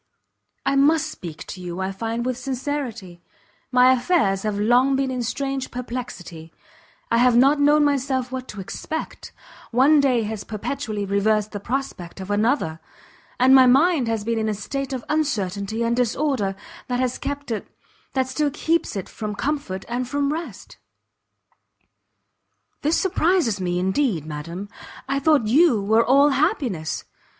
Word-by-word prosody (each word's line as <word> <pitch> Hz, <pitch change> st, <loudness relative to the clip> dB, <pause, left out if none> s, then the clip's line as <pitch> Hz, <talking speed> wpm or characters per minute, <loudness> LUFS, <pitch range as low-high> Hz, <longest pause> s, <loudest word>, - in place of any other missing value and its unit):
"I 275 Hz, -, +2 dB
must 310 Hz, +3 st, +3 dB
speak 160 Hz, -, -8 dB
to 185 Hz, -, -8 dB
you, 175 Hz, 0 st, -6 dB
I 190 Hz, +1 st, -2 dB
find, 225 Hz, +4 st, -3 dB
with 255 Hz, 0 st, -1 dB
sincerity; 255 Hz, -8 st, -4 dB, 0.5 s
my 250 Hz, 0 st, +6 dB
affairs 245 Hz, -, +1 dB
have 210 Hz, -1 st, -2 dB
long 245 Hz, +5 st, +4 dB
been 265 Hz, -1 st, 0 dB
in 250 Hz, -1 st, -2 dB
strange 270 Hz, +2 st, -3 dB
perplexity: 235 Hz, -10 st, -7 dB, 0.6 s
I 230 Hz, -, +4 dB
have 245 Hz, 0 st, +4 dB
not 275 Hz, +4 st, +5 dB
known 295 Hz, +1 st, +5 dB
myself 265 Hz, -3 st, 0 dB
what 260 Hz, 0 st, -5 dB
to 210 Hz, -, -8 dB
expect; 315 Hz, +11 st, -6 dB, 0.4 s
one 275 Hz, +6 st, +5 dB
day 255 Hz, -5 st, +2 dB
has 215 Hz, -1 st, -4 dB
perpetually 215 Hz, 0 st, -4 dB
reversed 210 Hz, +2 st, +1 dB
the 205 Hz, -, -5 dB
prospect 230 Hz, -7 st, -4 dB
of 190 Hz, +1 st, -6 dB
another, 205 Hz, -, +1 dB, 0.6 s
and 260 Hz, +1 st, +6 dB
my 260 Hz, -1 st, +8 dB
mind 275 Hz, +1 st, +4 dB
has 225 Hz, -2 st, -1 dB
been 230 Hz, +1 st, -1 dB
in 220 Hz, 0 st, 0 dB
a 210 Hz, -, -1 dB
state 275 Hz, +7 st, -4 dB
of 255 Hz, -3 st, -4 dB
uncertainty 220 Hz, -8 st, -1 dB
and 235 Hz, 0 st, +1 dB
disorder, 245 Hz, -4 st, 0 dB, 0.3 s
that 245 Hz, 0 st, -1 dB
has 255 Hz, -1 st, -1 dB
kept 285 Hz, -2 st, -4 dB
it 220 Hz, -, -3 dB, 0.5 s
that 260 Hz, -1 st, +1 dB
still 290 Hz, +3 st, 0 dB
keeps 320 Hz, +1 st, -1 dB
it 195 Hz, -, -4 dB
from 210 Hz, -2 st, -5 dB
comfort 275 Hz, -9 st, -3 dB
and 245 Hz, +1 st, -3 dB
from 285 Hz, 0 st, 0 dB
rest!" 310 Hz, -, -7 dB, 2.0 s
"This 305 Hz, +3 st, +2 dB
surprises 340 Hz, -, +1 dB
me 175 Hz, -1 st, -1 dB
indeed, 190 Hz, -, 0 dB
madam! 165 Hz, +6 st, -6 dB, 0.4 s
I 275 Hz, +1 st, 0 dB
thought 290 Hz, -4 st, +3 dB
you 270 Hz, +1 st, +4 dB
were 220 Hz, +3 st, +3 dB
all 280 Hz, +4 st, +5 dB
happiness! 265 Hz, -, -1 dB
245 Hz, 155 wpm, -23 LUFS, 205-275 Hz, 2.0 s, my